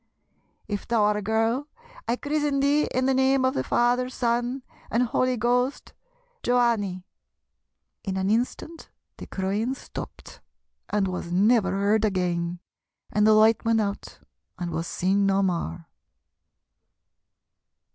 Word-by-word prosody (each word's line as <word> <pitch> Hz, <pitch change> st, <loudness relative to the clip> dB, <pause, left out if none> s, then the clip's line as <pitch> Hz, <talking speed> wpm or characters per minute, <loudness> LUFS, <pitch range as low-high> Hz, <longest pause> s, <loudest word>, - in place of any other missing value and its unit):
If 205 Hz, -1 st, -4 dB
thou 230 Hz, -3 st, +2 dB
are 210 Hz, 0 st, +2 dB
a -, -, -3 dB
girl 225 Hz, +6 st, 0 dB, 0.4 s
I 235 Hz, -, +1 dB
chrizzen 290 Hz, +1 st, -1 dB
thee 285 Hz, +2 st, +3 dB
in 255 Hz, 0 st, -1 dB
the 265 Hz, -, +3 dB
name 265 Hz, 0 st, +3 dB
of 260 Hz, -, +2 dB
the -, -, -1 dB
Father, 245 Hz, +1 st, +1 dB
Son, 245 Hz, +1 st, -1 dB, 0.3 s
and 235 Hz, +2 st, +2 dB
Holy 255 Hz, +1 st, 0 dB
Ghost, 245 Hz, +4 st, 0 dB, 0.5 s
Joanney!' 230 Hz, -7 st, +1 dB, 1.0 s
In 190 Hz, -3 st, -3 dB
an 190 Hz, +1 st, 0 dB
instant 255 Hz, +8 st, -2 dB, 0.3 s
the -, -, -9 dB
crying 205 Hz, +7 st, -2 dB
stopped, -, -, -10 dB, 0.5 s
and 205 Hz, -2 st, +1 dB
was 180 Hz, -2 st, -5 dB
never 205 Hz, +2 st, +3 dB
heard 200 Hz, +2 st, +2 dB
again, 180 Hz, -4 st, -1 dB, 0.5 s
and 210 Hz, +1 st, +3 dB
the 215 Hz, -, +6 dB
light 220 Hz, +1 st, +4 dB
went 230 Hz, 0 st, +2 dB
out 200 Hz, -2 st, -4 dB, 0.4 s
and 175 Hz, -1 st, -4 dB
was 165 Hz, +1 st, -3 dB
seen 195 Hz, +2 st, +1 dB
no 195 Hz, 0 st, +2 dB
more. 165 Hz, -, -2 dB
220 Hz, 135 wpm, -25 LUFS, 195-250 Hz, 1.0 s, the